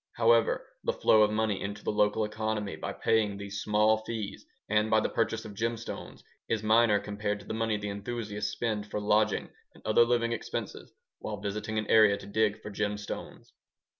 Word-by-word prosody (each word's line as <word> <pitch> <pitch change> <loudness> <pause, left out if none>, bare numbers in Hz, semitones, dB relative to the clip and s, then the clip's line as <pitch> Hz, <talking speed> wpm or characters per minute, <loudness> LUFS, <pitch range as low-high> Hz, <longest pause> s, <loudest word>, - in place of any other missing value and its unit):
However, 115 0 +3 0.2
the - - 0
flow 110 - +4
of 105 - +5
money 105 -2 0
into 100 +1 -5
the - - 0
local 105 +1 +2
economy 110 -1 -3
by - - -5
paying 105 -3 +1
these 100 0 -5
small 105 +1 +3
fees 110 -2 -6 0.2
and 105 +1 +2
by 110 - +5
the - - 0
purchase 115 -1 -1
of 105 - -8
gemstones 115 +2 -4 0.3
is 110 -2 0
minor 110 -1 +4
compared 105 0 -3
to - - -15
the - - -5
money 110 -1 0
the 105 0 -4
enthusiasts 105 0 -4
spend 105 -2 -2
for 105 - -2
lodging 105 0 +1 0.2
and - - -19
other 110 +2 +5
living 120 -1 +1
expenses 115 - -5 0.3
while 105 - -5
visiting 105 +2 -3
an 110 - 0
area 105 -2 +5
to 100 - -11
dig 105 +1 +1
for 105 - -6
gemstones. 105 0 -4
105 Hz, 185 wpm, -29 LUFS, 105-110 Hz, 0.3 s, of